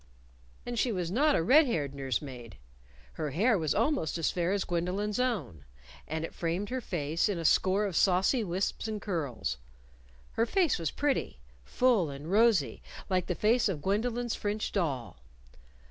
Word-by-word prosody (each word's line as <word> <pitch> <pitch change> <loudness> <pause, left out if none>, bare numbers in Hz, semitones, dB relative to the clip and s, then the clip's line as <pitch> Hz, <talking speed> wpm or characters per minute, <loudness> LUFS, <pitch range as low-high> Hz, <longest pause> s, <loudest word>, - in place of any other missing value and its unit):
And 240 -1 -3
she 245 - +1
was 180 -4 -2
not 290 +7 +3
a - - +1
red 285 - +6
haired 145 - -1
nurse 135 -2 -2
maid. 125 -5 -9 0.6
Her 150 - -3
hair 215 - +2
was 160 -6 0
almost 230 - 0
as 165 - 0
fair 175 0 0
as 200 -1 0
Gwendolyn's 185 +5 -2
own, 215 - -2 0.4
and 160 +1 -3
it - - -9
framed 175 +4 -2
her 260 0 -2
face 165 -2 -1
in 200 - -1
a 165 - -4
score 190 +6 +3
of 195 -4 -3
saucy 190 - +3
wisps 190 +4 -2
and 215 -1 -3
curls. 160 - -3 0.7
Her 230 - 0
face 345 - +2
was 165 -3 -1
pretty 285 - -1 0.2
full 220 - +2
and 145 +4 -7
rosy, 205 - +3 0.3
like 185 -1 +1
the 180 - -1
face 230 +3 +2
of 155 -7 -4
Gwendolyn's 235 +4 0
French 210 +1 -2
doll. 145 - -2
190 Hz, 170 wpm, -30 LUFS, 160-230 Hz, 0.7 s, red